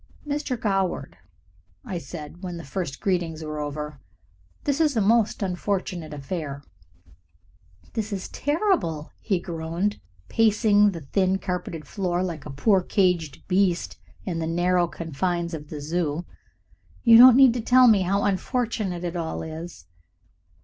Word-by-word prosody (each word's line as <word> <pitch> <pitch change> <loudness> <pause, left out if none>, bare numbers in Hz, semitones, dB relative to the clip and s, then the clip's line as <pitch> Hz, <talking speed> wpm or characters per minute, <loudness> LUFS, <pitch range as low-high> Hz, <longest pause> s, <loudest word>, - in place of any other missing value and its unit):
"Mr. 285 -4 -2
Goward," 195 -4 -1 0.7
I 190 -7 -4
said, 160 +2 -9
when 180 -3 -5
the 170 - -8
first 140 0 -4
greetings 170 -4 -1
were 155 -1 -5
over, 150 0 -5 0.6
"this 285 +2 0
is 295 -6 +2
a - - +4
most 220 0 +2
unfortunate 180 -3 -2
affair." 145 -1 -5 1.3
"It 220 -2 -3
is 195 -2 -4
terrible," 290 - 0
he 195 -5 0
groaned, 170 +4 -3 0.3
pacing 210 -2 +4
the 165 - -7
thin 185 +7 +1
carpeted 180 -4 -4
floor 180 -1 -1
like 165 -5 -5
a - - -6
poor 190 +8 +3
caged 180 -6 0
beast 185 -2 +1 0.3
in 170 -3 -2
the 160 - -2
narrow 175 +1 +2
confines 170 +2 -3
of 150 -2 -7
the 150 - -6
Zoo. 160 +1 -2 0.8
"You 230 -2 +8
don't 250 0 +10
need 265 -3 +7
to 240 - -2
tell 250 +2 +6
me 215 -4 +6
how 195 +2 +1
unfortunate 205 -3 -1
it 175 0 -3
all 165 -2 -3
is." 160 +2 -8
180 Hz, 140 wpm, -25 LUFS, 160-205 Hz, 1.3 s, don't